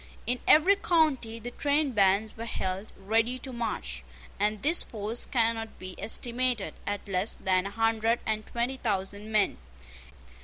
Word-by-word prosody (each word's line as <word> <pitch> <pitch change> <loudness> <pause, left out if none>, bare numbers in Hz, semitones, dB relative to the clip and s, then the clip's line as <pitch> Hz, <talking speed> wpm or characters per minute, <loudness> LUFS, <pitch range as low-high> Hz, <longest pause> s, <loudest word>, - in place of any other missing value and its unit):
In 250 +1 0
every 370 +6 +6
county 300 - +1
the 235 +2 -7
trainbands 220 -9 +2
were 230 - -6
held 190 -2 -3
ready 225 +5 +1
to 260 0 -8
march; 235 -3 -4 0.4
and 210 0 +1
this 330 +4 +5
force 220 +2 -2
cannot 225 -2 0
be 185 0 -7
estimated 240 -1 0
at 205 0 -3
less 195 +2 0
than 185 0 +1
a - - -4
hundred 225 +2 +1
and 215 -1 -1
twenty 240 +3 -2
thousand 205 -1 -3
men. 210 - +2
225 Hz, 145 wpm, -28 LUFS, 205-245 Hz, 0.4 s, every